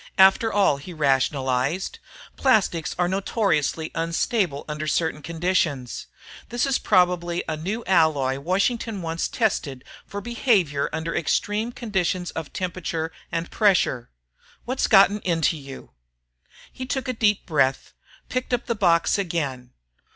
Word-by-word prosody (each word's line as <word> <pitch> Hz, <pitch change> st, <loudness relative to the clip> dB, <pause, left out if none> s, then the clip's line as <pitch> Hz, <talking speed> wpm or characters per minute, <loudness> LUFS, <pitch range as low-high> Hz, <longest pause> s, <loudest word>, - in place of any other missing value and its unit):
After 195 Hz, +4 st, +5 dB
all, 195 Hz, -8 st, +3 dB
he 155 Hz, +6 st, -9 dB
rationalized, 135 Hz, +2 st, 0 dB, 0.4 s
_plastics 200 Hz, -, +1 dB
are 180 Hz, 0 st, +2 dB
notoriously 190 Hz, -, 0 dB
unstable 165 Hz, -, -1 dB
under 150 Hz, 0 st, -4 dB
certain 160 Hz, 0 st, 0 dB
conditions. 165 Hz, -5 st, -1 dB, 0.4 s
This 240 Hz, +2 st, 0 dB
is 275 Hz, -1 st, +1 dB
probably 180 Hz, -2 st, +2 dB
a 160 Hz, -, -1 dB
new 195 Hz, +9 st, -4 dB
alloy 150 Hz, -7 st, +2 dB
Washington 200 Hz, -, -1 dB
wants 165 Hz, 0 st, -2 dB
tested 150 Hz, -, -1 dB, 0.2 s
for 200 Hz, -, -5 dB
behavior 200 Hz, -, +1 dB
under 160 Hz, +1 st, -3 dB
extreme 210 Hz, +8 st, 0 dB
conditions 185 Hz, -6 st, -2 dB
of 160 Hz, -2 st, -6 dB
temperature 170 Hz, -3 st, -3 dB, 0.2 s
and 170 Hz, 0 st, -3 dB
pressure. 185 Hz, -, +2 dB, 0.6 s
What's 255 Hz, +2 st, 0 dB
gotten 200 Hz, 0 st, +6 dB
into 165 Hz, -4 st, +1 dB
you?_ 135 Hz, -3 st, -10 dB, 0.8 s
He 255 Hz, -, -6 dB
took 265 Hz, 0 st, -2 dB
a 255 Hz, -, -1 dB
deep 210 Hz, -3 st, +1 dB
breath, 135 Hz, -4 st, 0 dB, 0.3 s
picked 255 Hz, 0 st, -1 dB
up 240 Hz, -, -6 dB
the 235 Hz, -, 0 dB
box 175 Hz, -2 st, +2 dB
again. 145 Hz, -9 st, -3 dB
175 Hz, 130 wpm, -24 LUFS, 150-205 Hz, 0.8 s, gotten